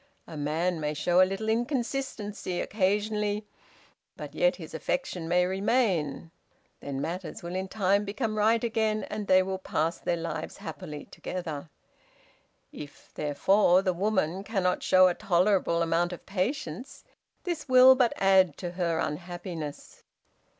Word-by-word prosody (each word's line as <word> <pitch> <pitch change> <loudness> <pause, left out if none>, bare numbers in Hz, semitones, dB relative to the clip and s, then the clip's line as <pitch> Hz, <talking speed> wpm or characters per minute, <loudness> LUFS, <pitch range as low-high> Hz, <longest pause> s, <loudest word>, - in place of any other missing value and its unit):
A 160 - -10
man 160 +4 -1
may 150 0 -2
show 175 +4 +3
a - - +7
little 195 +3 -4
inconsistency 235 -5 -2
occasionally, 210 +1 0 0.7
but - - -8
yet - - +2
his - - -10
affection 185 - -3
may 180 +1 +3
remain; 190 - 0 0.5
then 140 -1 -5
matters 170 +2 -5
will 170 +1 -5
in 190 +1 -2
time 200 0 +1
become 215 +2 -3
right 220 +2 +3
again, 220 -2 0
and 210 -1 -4
they 185 0 +5
will 190 0 -3
pass 165 -2 -1
their 170 - -1
lives 165 -1 -5
happily 180 -7 -8
together. 165 -4 -6 1.0
If, 145 -1 -11
therefore, 180 +5 +3
the 185 -2 +1
woman 190 -1 0
cannot 195 -4 0
show 185 0 +6
a 180 - +2
tolerable 175 -2 +2
amount 170 +2 +1
of 175 - -10
patience, 195 - -3 0.4
this 345 -6 -4
will 255 0 +9
but 255 -3 +2
add 190 -5 +4
to 175 -2 -5
her 175 -2 -1
unhappiness. 170 -1 -5
185 Hz, 140 wpm, -28 LUFS, 170-215 Hz, 1.0 s, will